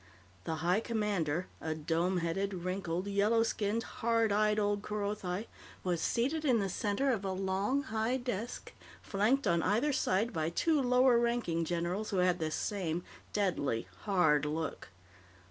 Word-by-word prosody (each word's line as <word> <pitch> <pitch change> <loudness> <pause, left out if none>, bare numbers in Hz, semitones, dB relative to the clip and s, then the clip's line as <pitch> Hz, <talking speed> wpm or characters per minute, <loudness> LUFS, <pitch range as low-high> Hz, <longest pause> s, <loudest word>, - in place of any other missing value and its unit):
The 160 - -1
High 180 +4 +4
Commander, 200 -8 -1 0.2
a 160 -1 -2
dome 165 +4 0
headed, 195 +4 -1
wrinkled, 180 0 -2
yellow 205 +3 +3
skinned, 225 0 -1
hard 230 -1 0
eyed 210 +1 +3
old 205 -1 +1
Kerothi, 205 -2 -3 0.4
was 175 -3 0
seated 280 - 0
in 255 -6 +4
the 200 -3 0
center 210 +8 0
of 215 -5 -1
a 195 - -1
long, 195 +8 0
high 225 +1 0
desk, 245 -2 -5 0.3
flanked 220 +7 +1
on 170 -3 +3
either 235 - +2
side 220 -1 +1
by 160 -1 0
two 305 - +2
lower 250 -1 +4
ranking 235 -9 0
generals 175 +5 -2
who 195 - -1
had 180 0 +3
the 160 -1 -1
same 175 0 -2 0.3
deadly, 160 - 0
hard 170 -8 +3
look. 155 +1 -3
200 Hz, 150 wpm, -32 LUFS, 175-225 Hz, 0.4 s, High